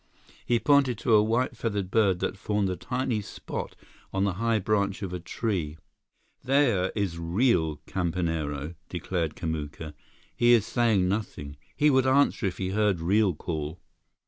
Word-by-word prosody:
He 120 Hz, -, +2 dB
pointed 140 Hz, -4 st, +3 dB
to 115 Hz, -, +1 dB
a 105 Hz, -, +7 dB
white 115 Hz, +4 st, 0 dB
feathered 100 Hz, -5 st, -3 dB
bird 100 Hz, -5 st, +2 dB
that -, -, -1 dB
formed 100 Hz, 0 st, -1 dB
a -, -, -2 dB
tiny 120 Hz, +4 st, -2 dB
spot -, -, -6 dB, 0.4 s
on 95 Hz, -, 0 dB
the 100 Hz, -2 st, +1 dB
high 115 Hz, -1 st, +2 dB
branch 100 Hz, -1 st, 0 dB
of 90 Hz, -2 st, -4 dB
a 90 Hz, -, -3 dB
tree. 85 Hz, -4 st, -3 dB, 0.7 s
"There 125 Hz, -9 st, +2 dB
is 95 Hz, -6 st, -2 dB
real 85 Hz, -, +1 dB
campanero," 80 Hz, -4 st, -2 dB, 0.2 s
declared 85 Hz, -2 st, -2 dB
Kamuka. 80 Hz, -1 st, -5 dB, 0.4 s
"He 120 Hz, 0 st, +5 dB
is 110 Hz, -3 st, +4 dB
saying 110 Hz, -7 st, +2 dB
nothing. 90 Hz, -8 st, -3 dB, 0.2 s
He 150 Hz, 0 st, +4 dB
would 130 Hz, -1 st, +3 dB
answer 135 Hz, -6 st, +3 dB
if 90 Hz, -, -4 dB
he 95 Hz, -, -2 dB
heard 100 Hz, -2 st, +1 dB
real 95 Hz, +2 st, +2 dB
call." 80 Hz, +1 st, -4 dB
100 Hz, 155 wpm, -27 LUFS, 85-115 Hz, 0.7 s, a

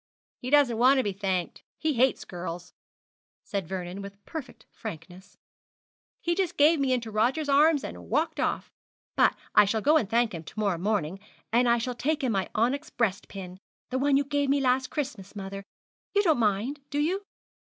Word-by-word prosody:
'He 250 Hz, -, -5 dB
doesn't 270 Hz, -5 st, +4 dB
want 260 Hz, +3 st, +6 dB
to 260 Hz, -, +3 dB
be 205 Hz, -, -1 dB
thanked. 185 Hz, -3 st, -2 dB, 0.2 s
He 315 Hz, -1 st, 0 dB
hates 260 Hz, +1 st, +2 dB
girls,' 175 Hz, 0 st, -7 dB, 0.7 s
said 195 Hz, -5 st, -3 dB
Vernon, 185 Hz, +1 st, -5 dB
with 200 Hz, 0 st, -11 dB
perfect 320 Hz, -5 st, -8 dB
frankness. 180 Hz, -2 st, -9 dB, 0.8 s
'He 345 Hz, -, +1 dB
just 370 Hz, -1 st, -1 dB
gave 300 Hz, +2 st, +5 dB
me 270 Hz, -2 st, +1 dB
into 235 Hz, -3 st, -1 dB
Rogers' 250 Hz, +8 st, +1 dB
arms 290 Hz, +1 st, +4 dB
and -, -, -8 dB
walked -, -, 0 dB
off. -, -, -1 dB, 0.4 s
But -, -, +4 dB, 0.2 s
I -, -, +7 dB
shall 220 Hz, +2 st, 0 dB
go 300 Hz, +7 st, +5 dB
and 215 Hz, -10 st, -1 dB
thank 235 Hz, -1 st, +2 dB
him 165 Hz, -2 st, -6 dB
to 215 Hz, -, -9 dB
morrow 200 Hz, -5 st, 0 dB
morning, 195 Hz, -2 st, -1 dB, 0.3 s
and 240 Hz, +1 st, +4 dB
I 235 Hz, -, +4 dB
shall 245 Hz, +2 st, -2 dB
take 295 Hz, +5 st, -1 dB
him 255 Hz, -, +1 dB
my 195 Hz, -2 st, -1 dB
onyx 255 Hz, +7 st, 0 dB
breast 210 Hz, -5 st, -1 dB
pin, 185 Hz, -2 st, -8 dB, 0.3 s
the 260 Hz, -, 0 dB
one 280 Hz, 0 st, +3 dB
you 285 Hz, -, +2 dB
gave 285 Hz, 0 st, 0 dB
me 280 Hz, +1 st, +3 dB
last 260 Hz, -1 st, +1 dB
Christmas, 235 Hz, -10 st, -5 dB
mother. 195 Hz, 0 st, -6 dB, 0.5 s
You 405 Hz, -, +4 dB
don't 320 Hz, -9 st, +3 dB
mind, 225 Hz, +6 st, 0 dB
do 285 Hz, -, -3 dB
you?' 340 Hz, +7 st, +1 dB
235 Hz, 190 wpm, -27 LUFS, 195-285 Hz, 0.8 s, I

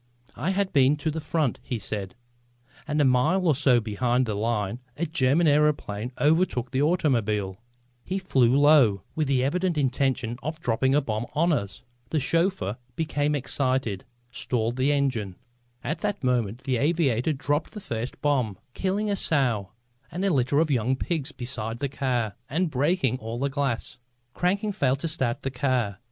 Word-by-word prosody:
"I 150 Hz, +9 st, -2 dB
had 195 Hz, 0 st, 0 dB
been 140 Hz, 0 st, +5 dB
to 155 Hz, +1 st, -1 dB
the 160 Hz, +1 st, -4 dB
front," 155 Hz, -5 st, -1 dB
he 125 Hz, -, -4 dB
said, 100 Hz, 0 st, -5 dB, 0.7 s
"and 150 Hz, 0 st, 0 dB
a 145 Hz, -, +4 dB
mile 130 Hz, +9 st, +3 dB
or 160 Hz, -, +5 dB
so 130 Hz, -3 st, +4 dB
behind 120 Hz, +3 st, 0 dB
the 110 Hz, -, -2 dB
line 105 Hz, +1 st, -1 dB, 0.2 s
a 170 Hz, -, 0 dB
German 150 Hz, +1 st, +2 dB
aëroplane 145 Hz, -7 st, +1 dB
overtook 150 Hz, -5 st, +2 dB
the 135 Hz, 0 st, +1 dB
automobile. 110 Hz, -, +1 dB, 0.4 s
He 190 Hz, -, -3 dB
flew 135 Hz, -9 st, +3 dB
low, 140 Hz, -10 st, +5 dB
with 155 Hz, -2 st, -1 dB
the 130 Hz, -2 st, +2 dB
evident 175 Hz, +4 st, 0 dB
intention 130 Hz, -3 st, 0 dB
of 155 Hz, +4 st, -4 dB
dropping 130 Hz, 0 st, +1 dB
a 145 Hz, -, +4 dB
bomb 110 Hz, -2 st, -3 dB
on 165 Hz, +3 st, +2 dB
us. 100 Hz, -8 st, -3 dB, 0.3 s
The 155 Hz, -, +1 dB
chauffeur, 145 Hz, -, 0 dB, 0.2 s
becoming 150 Hz, -2 st, 0 dB
excited, 130 Hz, -6 st, 0 dB, 0.3 s
stalled 120 Hz, -2 st, -1 dB
the 135 Hz, +3 st, +2 dB
engine. 130 Hz, -10 st, 0 dB, 0.5 s
At 155 Hz, +3 st, -2 dB
that 205 Hz, -5 st, -2 dB
moment 120 Hz, -2 st, 0 dB
the 130 Hz, -2 st, 0 dB
aviator 145 Hz, -2 st, +1 dB
dropped 145 Hz, +2 st, -1 dB
the 210 Hz, -, -6 dB
first 120 Hz, -, -5 dB
bomb, 130 Hz, -9 st, +1 dB, 0.2 s
killing 195 Hz, +3 st, -1 dB
a -, -, +2 dB
sow 125 Hz, -, +1 dB, 0.4 s
and 185 Hz, +3 st, -2 dB
a 195 Hz, -, +2 dB
litter 130 Hz, +1 st, +1 dB
of 160 Hz, -1 st, +2 dB
young 125 Hz, 0 st, +1 dB
pigs 150 Hz, +1 st, -2 dB
beside 120 Hz, -4 st, -5 dB
the 140 Hz, +3 st, -1 dB
car 125 Hz, -5 st, -1 dB
and 165 Hz, +2 st, 0 dB
breaking 140 Hz, -2 st, +1 dB
all 115 Hz, +1 st, -5 dB
the 140 Hz, +3 st, 0 dB
glass. 135 Hz, -5 st, -2 dB, 0.3 s
Cranking 200 Hz, +4 st, 0 dB
failed 135 Hz, -7 st, 0 dB
to -, -, -1 dB
start 135 Hz, -5 st, -1 dB
the 135 Hz, -, -2 dB
car. 125 Hz, -6 st, 0 dB
135 Hz, 170 wpm, -26 LUFS, 120-155 Hz, 0.7 s, been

